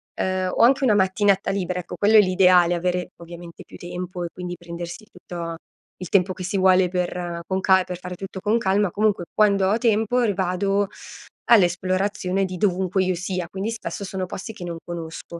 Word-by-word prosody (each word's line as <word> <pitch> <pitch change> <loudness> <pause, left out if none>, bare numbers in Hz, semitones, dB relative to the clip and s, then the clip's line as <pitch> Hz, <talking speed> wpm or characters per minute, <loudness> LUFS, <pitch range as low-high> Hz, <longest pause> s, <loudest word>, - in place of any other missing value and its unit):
ehm, 185 -1 -1
o - - 0
anche 270 +3 +4
una 225 -5 +4
mattinata 195 0 +2
libera, 180 -2 -2
ecco 175 - -7
quello 215 +2 +5
è - - +9
l'ideale, 180 -2 +4
avere 180 +1 -2
ovviamente 170 0 -11
più - - -13
tempo 180 0 -6
e - - -2
quindi 180 -1 -6
prendersi 175 +3 -8
tutto 170 -1 -7 0.4
il 180 -2 -8
tempo 185 -1 +2
che 185 - -8
si 190 +2 -2
vuole 185 -1 +4
per 175 -1 -3
con 190 0 -1
ca 190 -1 +4
per 180 -1 -6
fare 180 0 -7
tutto 190 0 -7
con 215 +4 +1
calma, 195 -2 +1
comunque 205 -4 0
quando 200 -3 +3
ho 215 - +2
tempo, 225 +2 +2
vado 195 +2 0 0.6
all'esplorazione 190 -1 +2
di 185 -1 -6
dovunque 190 -1 +1
io 185 -1 0
sia, 180 0 -3
quindi 195 +4 -4
spesso 225 -2 -6
sono 190 -1 -4
posti 205 +5 -7
che 185 - -10
non 170 -1 -5
conosco. 170 0 -7
185 Hz, 185 wpm, -23 LUFS, 180-200 Hz, 0.6 s, è